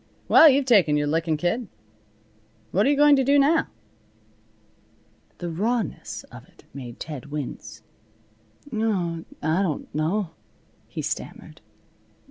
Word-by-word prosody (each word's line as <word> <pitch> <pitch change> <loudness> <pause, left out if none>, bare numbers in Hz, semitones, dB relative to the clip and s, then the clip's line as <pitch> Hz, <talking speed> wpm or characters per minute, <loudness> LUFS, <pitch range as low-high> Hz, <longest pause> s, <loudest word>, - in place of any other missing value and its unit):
"Well, 320 - +8
you've 275 0 +2
taken 190 - +4
your 145 - 0
lickin', 160 +1 0
kid. 180 +9 -1 1.0
What 200 +7 +2
you 290 - +3
going 295 0 +6
to 270 - +2
do 280 +2 +4
now?" 295 +4 +3 1.7
The 175 -1 -5
rawness 220 +7 -2
of - - -11
it - - -23
made 125 -4 -9
Ted 150 -4 -7
wince. 145 -2 -7 0.9
"Oh, 185 -7 -1 0.2
I 160 +5 +1
don't 170 -7 -3
know," 165 +4 -1 0.6
he - - -6
stammered. - - -6
180 Hz, 120 wpm, -24 LUFS, 155-245 Hz, 1.7 s, Well